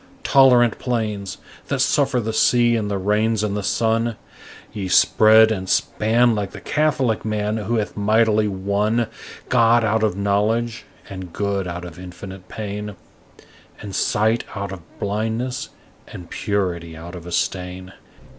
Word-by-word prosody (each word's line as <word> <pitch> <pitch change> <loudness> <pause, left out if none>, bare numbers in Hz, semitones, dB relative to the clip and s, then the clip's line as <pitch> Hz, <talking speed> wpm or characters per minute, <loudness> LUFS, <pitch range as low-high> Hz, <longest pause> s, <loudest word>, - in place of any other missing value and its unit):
Tolerant 125 -4 +5
plains, 105 -6 -3 0.3
that - - -1
suffer 125 - +2
the 110 -1 -3
sea 120 +1 +3
and 105 -2 -1
the 100 - -1
rains 105 +3 +1
and 105 -1 -1
the 105 - -2
sun, 115 +2 0 0.6
Ye 100 -3 -4
spread 110 +4 +5
and 95 -3 -3
span 115 +2 +2
like 100 -3 -3
the - - -8
catholic 140 -7 0
man 105 0 -1
who 110 +2 -2
hath 105 -2 -2
mightily 110 +1 +2
won 100 +4 0 0.4
God 120 -1 +4
out 110 +1 +1
of 105 -4 0
knowledge 110 +4 0 0.2
and 95 -3 -8
good 100 -1 -2
out 90 0 -5
of 85 -1 -10
infinite 90 +1 -10
pain 105 -1 -6 0.8
And 100 - -8
sight 110 +2 +1
out 100 -2 -4
of 95 -3 -7 0.2
blindness 110 +5 -2 0.4
and 90 -2 -11
purity 85 -5 -2
out 85 +2 -9
of 90 -1 -9
a - - -7
stain. 90 +1 -3
105 Hz, 145 wpm, -21 LUFS, 95-115 Hz, 0.8 s, Tolerant